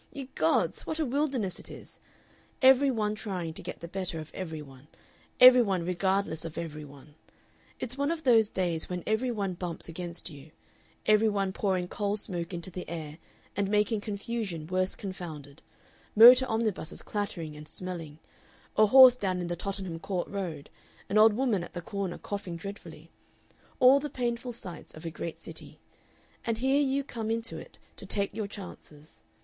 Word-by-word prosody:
Ye 275 -3 -7
gods! 160 +1 +1
what 315 - -2
a 315 - 0
wilderness 265 - -1
it - - -11
is! - - -12 0.6
Every 265 +1 +7
one 215 -4 0
trying 185 -6 -4
to - - -6
get - - -7
the 170 - -6
better 180 -1 -3
of 155 -1 -7
every 160 -4 -5
one, 135 0 -15 0.5
every 250 0 +10
one 190 -6 0
regardless 190 -2 0
of 165 -1 -7
every 155 -2 -5
one 145 +1 -14 0.7
it's 255 +2 -3
one 285 +1 +1
of 325 -1 -2
those 225 -5 +5
days 175 -4 -1
when 180 -1 -4
every 220 +4 +1
one 200 -5 -2
bumps 175 -1 -5
against 170 +1 -5
you 145 -2 -11 0.6
every 215 +1 +5
one 195 -2 -1
pouring 185 -3 0
coal 205 +2 -1
smoke 175 -4 -3
into 175 +1 -5
the 180 +1 -7
air 160 -1 -6 0.4
and 200 0 0
making 210 +1 +2
confusion 200 -5 -4
worse 185 +2 0
confounded, 160 -7 -8 0.5
motor 250 +4 +9
omnibuses 220 -8 -2
clattering 175 -7 -4
and 150 0 -10
smelling, 165 -5 -6 0.6
a 215 - +6
horse 255 +2 +9
down 190 -6 -1
in 175 -1 -3
the 175 - -1
Tottenham 190 -2 -4
Court 180 +1 -3
Road, 175 -8 -5 0.4
an 215 - +3
old 220 0 +7
woman 225 -6 +1
at - - -10
the 175 - -4
corner 200 -3 -3
coughing 200 -4 -5
dreadfully 165 -3 -9 0.7
all 260 +2 +7
the 295 +1 -4
painful 245 -1 -2
sights 185 -7 -8
of 155 +2 -11
a 165 - -3
great 165 0 -6
city, - - -9 0.6
and 230 -1 -1
here 265 +4 +2
you 275 0 +1
come 230 -5 -5
into 230 +1 -2
it - - -13 0.2
to - - -7
take 200 -1 0
your 215 -1 -3
chances. 175 -7 -11
195 Hz, 175 wpm, -29 LUFS, 170-225 Hz, 0.7 s, every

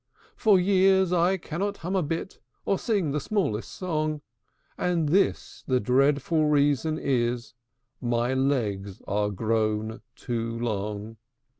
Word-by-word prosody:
For 210 -5 +4
years 190 -1 +4
I 180 +2 +3
cannot 195 +4 -3
hum 185 +2 -1
a 190 - +3
bit, 165 +4 -4 0.3
Or 195 - +1
sing 200 -10 0
the 150 - 0
smallest 145 - -1
song; 155 -4 -2 0.5
And 170 -4 0
this 195 +6 +1
the 130 -1 +2
dreadful 140 +6 +2
reason 145 +1 +2
is, 120 -4 -1 0.5
My 120 +1 0
legs 110 -8 -1
are 105 +1 0
grown 110 +2 -1
too 115 -1 -3
long! 105 -1 -3
140 Hz, 125 wpm, -26 LUFS, 115-175 Hz, 0.5 s, For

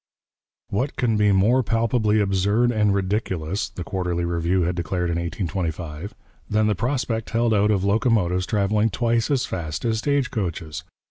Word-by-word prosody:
'What 125 +8 -1
can 115 -3 +1
be 105 -1 +3
more 105 +7 +4
palpably 115 -2 +1
absurd 100 +4 +2
and 105 -3 +2
ridiculous,' 95 -2 -1
the 90 - -7
Quarterly 90 -1 -2
Review 85 +2 0
had 90 +2 0
declared 85 +1 -2
in 85 - -1
1825, 85 0 -4 0.3
'than 110 0 +2
the 105 - +2
prospect 115 +1 -2
held 115 0 +1
out 105 0 +3
of 100 -3 +1
locomotives 100 -4 +1
travelling 105 +1 +1
twice 115 -1 0
as 135 -3 +1
fast 80 -2 -4
as 110 -1 +1
stage 140 0 0
coaches! 85 -5 -4
100 Hz, 155 wpm, -23 LUFS, 90-115 Hz, 0.3 s, more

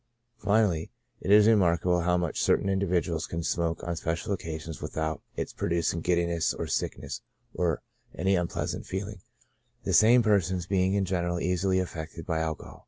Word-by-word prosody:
Finally, 100 -5 +2 0.3
it - - -5
is 105 +1 +7
remarkable 90 -4 +3
how 90 +1 +2
much 85 -3 -1
certain - - +2
individuals 90 -4 0
can 85 0 -4
smoke 85 0 -1
on 85 - -2
special 85 +4 -2
occasions 80 -3 -5
without 80 -2 -3
its - - -4
producing 85 0 0
giddi 85 0 +2
ness, 85 -2 0
or - - -3
sickness, - - -3 0.3
or 85 -3 0 0.3
any 95 +3 +2
unpleasant 90 -1 -2
feeling, 95 +1 -5 0.6
the - - -1
same 120 +3 +6
persons 95 -4 +2
being 95 +1 +1
in 100 -1 +1
general 85 -1 -1
easily 90 +2 +1
affected 80 -3 -4
by 80 -2 -1
tobacco. 80 -1 -4
90 Hz, 160 wpm, -28 LUFS, 85-95 Hz, 0.6 s, is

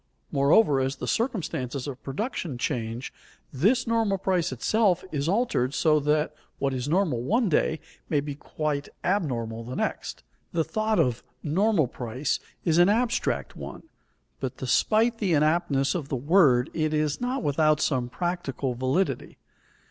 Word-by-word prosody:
Moreover, 140 +2 +4
as 135 +1 0
the - - -6
circumstances 155 - -2
of 135 -3 -6
production 160 - -4
change, 120 0 -3 0.4
this 220 - +2
normal 225 -4 +1
price 185 -4 0
itself 185 - +2
is 145 +1 -1
altered 180 - +1
so 155 -2 +3
that 150 +1 +1 0.2
what 135 -1 0
is 130 +2 -3
normal 165 -8 +1
one 220 - +1
day 160 0 +1 0.3
may 150 - +2
be 145 0 -4
quite 145 0 -3
abnormal 120 - -1
the 125 +3 -6
next. - - -3 0.3
The 165 - +2
thought 215 +7 0
of 125 -7 +1 0.2
"normal 185 +1 +2
price" 125 +3 -3 0.3
is 165 0 +3
an 175 +2 +6
abstract 235 +3 0
one, - - -8 0.6
but - - -4
despite 225 +1 +2
the 195 -5 +1
inaptness 150 -2 +2
of 160 -7 -4
the - - -1
word 140 -2 +4
it 155 -1 0
is 150 +3 0
not 250 +1 -1
without 155 +1 +3
some 130 -6 0
practical 145 -5 -2
validity. 130 +10 -1
155 Hz, 150 wpm, -26 LUFS, 135-195 Hz, 0.6 s, an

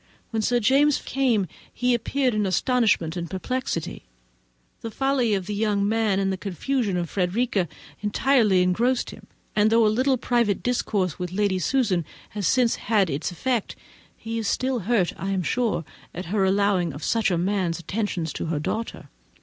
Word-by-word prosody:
When 225 -1 0
Sir 240 +3 +2
James 275 +5 +3
came, 245 -7 +1 0.3
he 250 0 +1
appeared 250 +2 0
all 210 -2 +1
astonishment 200 -5 +1
and 170 -2 -4
perplexity; 190 -2 -3 0.8
the 230 - -4
folly 255 -2 +1
of 190 -2 -3
the 210 - -4
young 205 -1 +1
man 220 -2 +1
and 195 -1 0
the - - -3
confusion 205 +2 -1
of 175 -1 -1
Frederica 195 +2 0 0.3
entirely 210 -3 +3
engrossed 235 +8 +1
him; - - -13 0.3
and 210 0 +4
though 225 0 +4
a 210 - +3
little 260 +3 +2
private 235 -4 +1
discourse 200 -8 -1
with 180 -1 -4
Lady 195 -1 +1
Susan 200 - +1 0.3
has 205 -4 -2
since 245 +1 +3
had 205 -6 +1
its 140 +3 -2
effect, 235 +5 -2 0.4
he 225 0 -4
is 220 - -2
still 255 +3 0
hurt, 205 -8 +2
I 195 - -4
am 190 -2 0
sure, 225 -6 0 0.3
at 180 - -5
her 200 -3 +3
allowing 195 -2 +2
of 145 - -8
such 225 -3 +1
a 175 - +1
man's 180 -1 0
attentions 175 -3 -3
to - - -4
her 160 -1 -1
daughter. 220 +9 -4
210 Hz, 175 wpm, -24 LUFS, 185-240 Hz, 0.8 s, and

